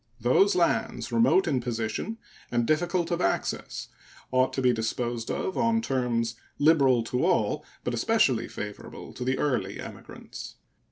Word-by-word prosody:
Those 130 - +4
lands, 220 +6 0
remote 230 -5 +4
in 135 -5 +1
position 120 - -3 0.3
and 120 -1 +1
difficult 170 +4 +1
of 170 - 0
access, - - -2 0.4
ought 130 0 +3
to 135 - -1
be 125 -1 +5
disposed 115 +1 -2
of 190 - -2
on 230 -1 +3
terms 125 - 0 0.2
liberal 140 -6 +4
to 125 +2 -1
all, - - +1 0.2
but 125 - -2
especially 125 - +2
favorable 105 -1 -8
to 125 - -5
the 130 +2 0
early 140 -4 -1
emigrants. - - -9
130 Hz, 145 wpm, -27 LUFS, 120-175 Hz, 0.4 s, be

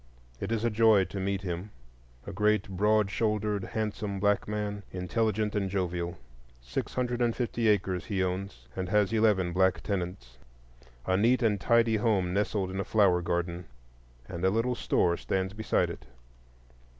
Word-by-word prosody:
It 100 - -4
is 115 -1 0
a 120 - +1
joy 110 -2 +5
to 100 - -6
meet 95 0 -2
him,—a 60 - -9
great 105 +1 +2
broad 105 +1 +2
shouldered, 105 -2 0
handsome 105 -2 -3
black 100 0 +1
man, 105 -1 -3
intelligent 105 +3 -1
and 100 -2 -1
jovial. 90 -2 -2 0.4
Six - - -5
hundred 125 -1 -1
and 120 -1 +2
fifty 120 -2 -1
acres 95 -3 +1
he 95 -3 -1
owns, 90 -9 -4
and 95 -1 -3
has 105 +1 +2
eleven 105 -6 +2
black 95 +1 +2
tenants. 90 - -4 0.7
A 95 - +1
neat 120 +5 +3
and 105 -4 +1
tidy 115 -1 +3
home 100 -5 +1
nestled 100 -1 0
in 95 - -4
a - - 0
flower 95 -5 +3
garden, 85 0 -2 0.6
and 85 - -6
a 95 - +4
little 115 +5 +1
store 85 -7 +1
stands 95 0 -2
beside 110 +1 0
it. 65 - -10
100 Hz, 160 wpm, -29 LUFS, 90-110 Hz, 0.7 s, joy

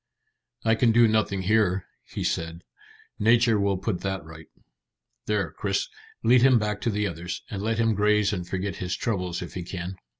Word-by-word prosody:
"I 110 - +4
can 115 +1 +3
do 120 +1 +6
nothing 105 -3 +1
here," 95 -2 +2 0.2
he - - -5
said. 85 +1 -2 0.6
"Nature 115 0 +4
will 100 -1 +1
put 95 -1 -3
that 95 -5 -3
right. 80 0 -12 0.8
There, 100 -7 0
Chris, - - -2 0.3
lead 120 +2 +5
him 130 -1 +6
back 105 -2 -2
to - - 0
the 105 -1 0
others, 85 -2 -5
and 100 - -4
let 110 +2 -1
him 115 -1 +2
graze 105 0 +2
and 90 -3 -4
forget 95 0 -3
his 90 0 -2
troubles 90 -7 -2
if 85 - -9
he 90 - -4
can." 90 +1 -6
100 Hz, 180 wpm, -26 LUFS, 90-110 Hz, 0.8 s, do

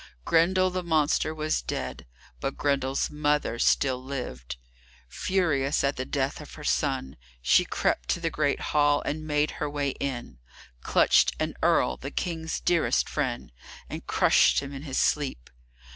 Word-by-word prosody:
Grendel 185 +3 +3
the 185 0 -2
monster 155 -2 +1
was 155 0 -1
dead, 65 0 -5 0.3
but - - -3
Grendel's 140 -2 0
mother 150 -5 0
still 130 -1 +2
lived. 65 - -6 0.5
Furious 150 - 0
at 140 +1 +1
the 130 - -4
death 140 +1 -2
of 150 - -11
her 150 - -10
son, 135 - -1 0.2
she - - +4
crept - - -1
to - - +1
the 165 -1 -2
great 145 -2 0
hall, 145 -1 +3
and 155 +1 -4
made 150 0 +1
her 150 - 0
way 145 -1 -1
in, 120 - -5 0.4
clutched - - +4
an - - -1
earl, 65 0 +2
the - - -6
King's 165 -2 -3
dearest 175 -2 +2
friend, 130 -5 -3 0.4
and - - -7
crushed - - +4
him 140 0 -7
in 135 - -7
his 140 -3 -4
sleep. 140 - 0
145 Hz, 155 wpm, -27 LUFS, 130-155 Hz, 0.5 s, she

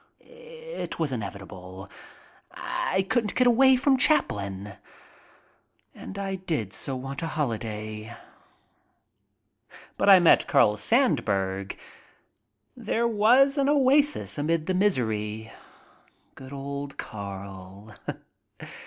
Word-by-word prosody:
It 485 0 -9
was 160 -4 -1
inevitable. 95 -4 -7 0.6
I 190 +1 -2
couldn't 225 -2 0
get 255 - +3
away 260 +2 +6
from 270 +1 +3
Chaplin. 100 - 0 1.2
And 195 - -9
I 195 -1 -3
did 155 - -3
so 135 - -1
want 135 +2 -6
a 165 - -2
holiday. 110 -5 -4 1.8
But - - +3
I 195 - +10
met 175 - +5
Carl 105 -7 +4
Sandburg. 100 - 0 1.0
There 235 +1 -1
was 245 +6 +4
an 275 0 +2
oasis 285 - +2
amid 155 +2 0
the 185 - -1
misery. 110 - -1 0.8
Good 130 0 -12
old 140 0 -6
Carl! 100 0 -8
140 Hz, 100 wpm, -26 LUFS, -, 1.8 s, I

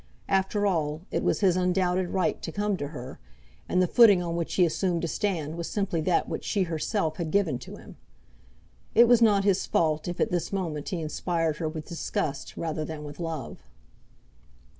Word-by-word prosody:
After 195 +2 +1
all, 155 -5 0
it - - 0
was - - +1
his 185 -3 +4
undoubted 180 0 +1
right 185 -4 0
to - - -5
come 205 +2 0
to 145 -3 -4
her, 130 -3 -8 0.5
and 180 - +2
the - - +2
footing 210 -2 +7
on 170 -1 -3
which 170 -1 -2
he 180 - +5
assumed 170 +1 0
to - - 0
stand 165 -5 -2
was 170 - -4
simply 195 -5 -1
that 175 +2 +1
which - - -4
she 200 - 0
herself 165 0 -1
had 170 -3 -3
given 165 -9 +1
to - - -9
him. - - -13 1.0
It 235 +1 +8
was 240 -1 +5
not 205 -3 +5
his 195 -2 +2
fault 155 -1 +1
if 175 0 -4
at - - +1
this 175 -1 -1
moment 165 -7 -3
he 180 -4 -3
inspired 160 0 -1
her 160 - -2
with 155 -1 -6
disgust 150 -4 -3
rather 160 -1 -2
than 155 -1 -6
with 145 0 -9
love. 165 -6 -5
170 Hz, 195 wpm, -27 LUFS, 155-195 Hz, 1.0 s, It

